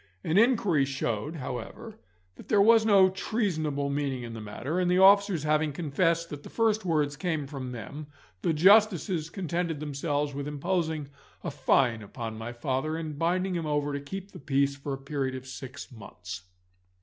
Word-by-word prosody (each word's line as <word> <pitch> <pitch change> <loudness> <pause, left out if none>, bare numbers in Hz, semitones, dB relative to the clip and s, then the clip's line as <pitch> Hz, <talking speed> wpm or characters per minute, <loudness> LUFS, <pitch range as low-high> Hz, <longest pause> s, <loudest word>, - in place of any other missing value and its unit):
An 160 - -1
inquiry 210 - +4
showed, 135 +1 -2
however, 155 - -7 0.4
that - - -13
there 210 - +3
was 220 +2 +6
no 195 -3 +7
treasonable 160 -9 -1
meaning 140 -3 -2
in 115 -1 -7
the 110 - -7
matter, 120 - -3
and 180 -1 +1
the 180 - +3
officers 195 -3 +5
having 155 0 +2
confessed 165 +2 0
that 145 -1 -6
the - - -11
first 220 -1 +1
words 150 -5 +1
came 160 -2 -2
from 135 -3 -6
them, 125 +6 -7 0.3
the - - +1
Justices 180 -2 +4
contented 170 -3 -2
themselves 145 0 -2
with 140 +1 -4
imposing 155 0 -2 0.3
a - - -3
fine 130 -4 +2
upon 110 +2 -6
my 115 +2 -6
father, 135 +6 -2
and 155 -3 -5
binding 180 +3 +1
him 165 -3 -2
over 145 -1 0
to 140 - -2
keep 195 +7 -7
the - - -10
peace 140 0 +1
for 140 0 -6
a - - -3
period 135 -1 -3
of 130 0 -7
six 130 +1 -8
months. 95 -4 -9
150 Hz, 175 wpm, -28 LUFS, 135-180 Hz, 0.4 s, no